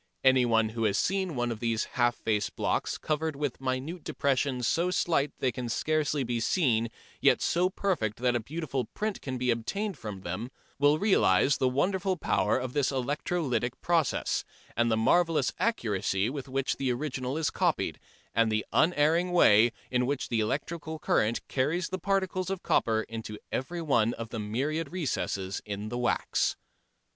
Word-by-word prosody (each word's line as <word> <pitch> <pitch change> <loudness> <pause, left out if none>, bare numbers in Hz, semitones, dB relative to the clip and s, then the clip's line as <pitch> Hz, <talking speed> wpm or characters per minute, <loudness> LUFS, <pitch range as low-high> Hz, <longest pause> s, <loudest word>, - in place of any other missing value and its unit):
Anyone 120 -4 +4
who 115 0 -2
has 100 -2 +2
seen 190 -4 0
one 120 -1 0
of 110 - -5
these 115 -1 0
"half 120 -1 +1
tone" 110 -2 +2 0.2
blocks - - -1
covered 155 0 -1
with 140 -2 -3
minute 135 +6 -3
depressions 130 -3 0
so 170 +2 +2
slight 165 -5 +1
that - - -36
they 130 - +2
can 120 +1 -5
scarcely 150 +2 0
be 120 -1 -1
seen, 115 -4 +2 0.3
yet - - +5
so 180 +2 +2
perfect 165 - -1
that 125 0 +1
a - - +2
beautiful 140 0 -3
print 215 -1 -2
can 130 -2 -4
be 125 0 +1
obtained 185 - -2
from 105 -4 -6
them, 95 +7 -4 0.3
will 145 +1 +5
realise 190 -7 +3
the 130 - +2
wonderful 185 +7 0
power 100 - +1
of 125 -1 -4
this 145 -3 +2
electrolytic 135 -1 -1
process, 165 -5 +1 0.3
the 115 -1 +2
marvellous 155 +1 +3
accuracy 105 - 0
with 140 -2 -6
which 135 +1 -1
the 135 -2 0
original 130 +1 -3
is 160 -2 0
copied, - - 0 0.3
and 115 0 +3
the 110 0 0
unerring 165 +2 +3
way 115 -9 +6 0.2
in 125 -1 +1
which 140 -1 -2
the 115 - +1
electric 150 +9 -2 0.2
current 110 +2 +1
carries 155 +7 0
the 185 - -3
particles 190 -2 0
of 195 -2 -3
copper 110 -1 +2
into 110 -2 -7
every 170 +6 -3
one 120 -6 +2
of 115 -1 -6
the 115 - -5
myriad 140 +9 -2
recesses 100 - -2
in 105 +1 -5
the 120 - -3
wax. 120 - +1
130 Hz, 170 wpm, -29 LUFS, 115-160 Hz, 0.3 s, way